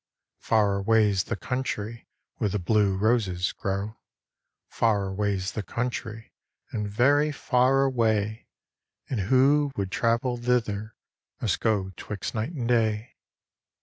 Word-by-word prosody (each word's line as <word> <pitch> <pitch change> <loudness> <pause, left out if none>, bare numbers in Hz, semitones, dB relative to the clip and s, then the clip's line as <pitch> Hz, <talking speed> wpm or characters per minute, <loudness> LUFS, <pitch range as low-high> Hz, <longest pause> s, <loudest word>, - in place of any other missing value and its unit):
Far 100 -3 +2
avia^i 105 -3 +3
tht - - -4
tounlry 115 -3 -3 0.3
vihere 105 - 0
the 105 - 0
blue 100 0 +2
Tostt 100 -5 +1
grow. 100 +3 -3 0.7
Far 105 -4 +1
aviafs 100 0 -1
the 110 - -2
country 115 0 -4 0.4
and 105 -2 -3
very 145 +8 +3
far 135 -1 +2
away. 110 -5 0 0.6
And 125 - 0
vako 135 +7 +3
would 95 -2 -2
travel 115 +3 +1
thither 115 -3 -1 0.4
must 110 - 0
go 100 -4 0
'tviixt 105 +2 -5
night 115 +8 -2
and 125 -7 -3
day. 110 -1 +1
110 Hz, 120 wpm, -26 LUFS, 100-125 Hz, 0.7 s, avia^i